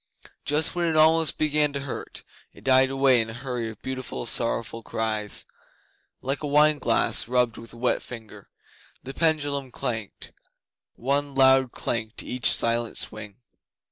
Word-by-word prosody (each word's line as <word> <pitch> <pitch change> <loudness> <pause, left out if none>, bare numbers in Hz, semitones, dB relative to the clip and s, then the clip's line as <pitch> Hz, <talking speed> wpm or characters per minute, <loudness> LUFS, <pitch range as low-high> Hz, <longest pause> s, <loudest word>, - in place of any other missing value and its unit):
Just 150 +2 +1
when 175 -1 0
it 160 - 0
almost 160 0 +4
began 150 -1 +2
to 140 - -3
hurt, 135 -2 -6 0.3
it - - -17
died 130 0 +5
away 135 -2 +4
in 115 - -4
a - - -7
hurry 125 -2 -4
of 110 - -11
beautiful 130 -2 -5
sorrowful 115 -1 0
cries, 110 -2 -3 0.8
like 135 +2 -2
a 150 - -3
wine 150 +1 +4
glass - - +1
rubbed 125 -2 +1
with 115 - -10
a - - -11
wet 125 +1 0
finger. 115 -4 -10 0.5
The 135 - -7
pendulum 145 -4 0
clanked 115 -5 -5 0.6
one 140 +2 -1
loud 130 -1 +5
clank 110 -1 -3
to - - -3
each 125 -2 +1
silent 115 0 +1
swing. 105 +1 -2
130 Hz, 155 wpm, -25 LUFS, 115-145 Hz, 0.8 s, died